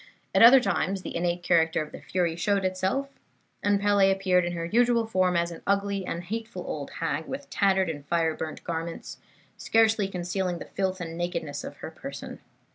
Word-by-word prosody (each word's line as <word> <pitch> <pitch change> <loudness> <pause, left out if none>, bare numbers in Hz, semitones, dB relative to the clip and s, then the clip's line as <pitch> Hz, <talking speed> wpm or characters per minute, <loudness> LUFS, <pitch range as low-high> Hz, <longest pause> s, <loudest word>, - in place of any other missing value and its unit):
"At - - +4
other 245 +4 +10
times 195 -3 -1
the - - -6
innate 175 0 -1
character 165 -2 +3
of 150 - -12
the - - -10
fury 170 +2 -1
showed 200 +3 0
itself, 190 +9 0 0.5
and 205 -1 +2
Pele 200 -1 +4
appeared 190 -2 +2
in 175 - -2
her 170 -1 -3
usual 235 +4 +3
form 185 -5 +1
as 170 0 0
an 165 - -9
ugly 200 -1 0
and 170 +1 -3
hateful 215 -1 -5
old 145 -2 -5
hag, 160 -1 -1
with 280 +1 -7
tattered 190 -2 +2
and 150 -3 -5
fire 165 -1 +1
burnt 155 - -6
garments, 165 0 -5 0.4
scarcely 220 -2 +3
concealing 180 -1 -2
the - - -8
filth 190 -1 -2
and 165 -1 -5
nakedness 170 -4 -3
of - - -8
her - - -7
person. - - -8
185 Hz, 190 wpm, -27 LUFS, 170-200 Hz, 0.5 s, other